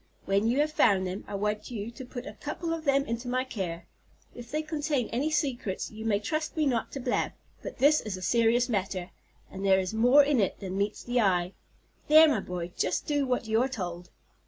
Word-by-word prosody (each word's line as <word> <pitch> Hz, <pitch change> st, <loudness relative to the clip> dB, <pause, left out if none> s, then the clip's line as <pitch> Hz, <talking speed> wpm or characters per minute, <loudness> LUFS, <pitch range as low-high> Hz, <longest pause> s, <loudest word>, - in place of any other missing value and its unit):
When 200 Hz, +3 st, +2 dB
you 240 Hz, +3 st, +1 dB
have 305 Hz, +1 st, 0 dB
found 200 Hz, -10 st, +3 dB
them, 185 Hz, +2 st, -4 dB
I -, -, -5 dB
want 210 Hz, +1 st, -2 dB
you 225 Hz, -2 st, -5 dB
to 260 Hz, -, -9 dB
put 245 Hz, 0 st, -7 dB
a -, -, -7 dB
couple 330 Hz, -1 st, -4 dB
of 325 Hz, -1 st, -5 dB
them 275 Hz, 0 st, +3 dB
into 235 Hz, +1 st, -4 dB
my 255 Hz, +1 st, 0 dB
care. 180 Hz, -9 st, -5 dB, 0.5 s
If 240 Hz, -1 st, -10 dB
they 305 Hz, +3 st, -2 dB
contain 295 Hz, -5 st, -1 dB
any 270 Hz, +6 st, 0 dB
secrets 260 Hz, -, -2 dB
you 220 Hz, 0 st, -8 dB
may 205 Hz, -2 st, +2 dB
trust 310 Hz, +10 st, -3 dB
me 310 Hz, -, +2 dB
not 245 Hz, -5 st, 0 dB
to 275 Hz, -, -4 dB
blab; 250 Hz, -1 st, -1 dB, 0.3 s
but -, -, -7 dB
this 300 Hz, +2 st, +4 dB
is 210 Hz, -4 st, -5 dB
a -, -, -9 dB
serious 235 Hz, +3 st, +3 dB
matter, 190 Hz, -5 st, -2 dB, 0.4 s
and 190 Hz, -, -7 dB
there 190 Hz, -1 st, +4 dB
is 185 Hz, +2 st, -3 dB
more 245 Hz, +6 st, +6 dB
in 280 Hz, -3 st, +2 dB
it 195 Hz, -, 0 dB
than 190 Hz, -2 st, -5 dB
meets 200 Hz, +2 st, -2 dB
the 245 Hz, 0 st, +1 dB
eye. 180 Hz, -2 st, +1 dB, 0.5 s
There, 315 Hz, +1 st, +8 dB
my 275 Hz, -8 st, +2 dB
boy, 180 Hz, -2 st, -5 dB
just 185 Hz, -, -1 dB
do 290 Hz, -2 st, 0 dB
what 250 Hz, -2 st, 0 dB
you 220 Hz, +1 st, +2 dB
are 260 Hz, -, +1 dB
told." 180 Hz, -7 st, -5 dB
235 Hz, 225 wpm, -28 LUFS, 195-275 Hz, 0.5 s, There